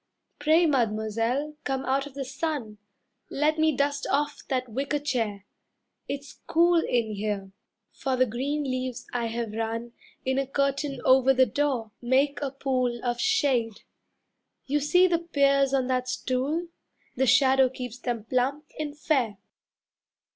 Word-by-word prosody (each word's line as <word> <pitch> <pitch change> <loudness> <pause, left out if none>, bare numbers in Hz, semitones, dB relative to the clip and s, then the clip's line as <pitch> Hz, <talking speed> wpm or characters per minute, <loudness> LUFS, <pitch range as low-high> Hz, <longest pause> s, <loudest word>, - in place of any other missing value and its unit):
Pray, 315 +4 +4
Mademoiselle, 230 +1 0
come 270 -1 -2
out 270 +2 0
of 280 - -14
the 275 -1 -4
sun. 270 -6 -4 0.5
Let 305 +2 +1
me 315 -3 +3
dust 285 0 0
off 290 +1 0
that 255 -1 -1
wicker 275 +6 -2
chair. 225 -9 -2 0.6
It's 280 +1 -7
cool 340 +1 +4
In 230 -3 0
here, 200 -2 -3 0.4
for 265 -2 -2
the 255 0 +4
green 270 +6 -2
leaves 255 -2 -3
I 240 -1 0
have 230 -1 -3
run 225 +2 -3 0.3
In 265 +1 +1
a 275 - -1
curtain 275 0 -1
over 265 +1 +5
the 260 0 +6
door, 250 -2 -1
make 270 +4 +2
a 280 - -1
pool 255 -3 -1
Of 240 -1 -1
shade. 255 - +1 0.8
You 290 +2 +1
see 355 +6 +4
the 345 -2 +2
pears 275 -4 +2
on 270 -2 +2
that 255 0 0
stool 275 +7 -1 0.5
The 265 +1 +1
shadow 265 +1 +5
keeps 250 -2 -7
them 240 -3 -3
plump 260 +6 0
and 295 -1 -4
fair." 255 -9 0
265 Hz, 145 wpm, -27 LUFS, 240-290 Hz, 0.8 s, the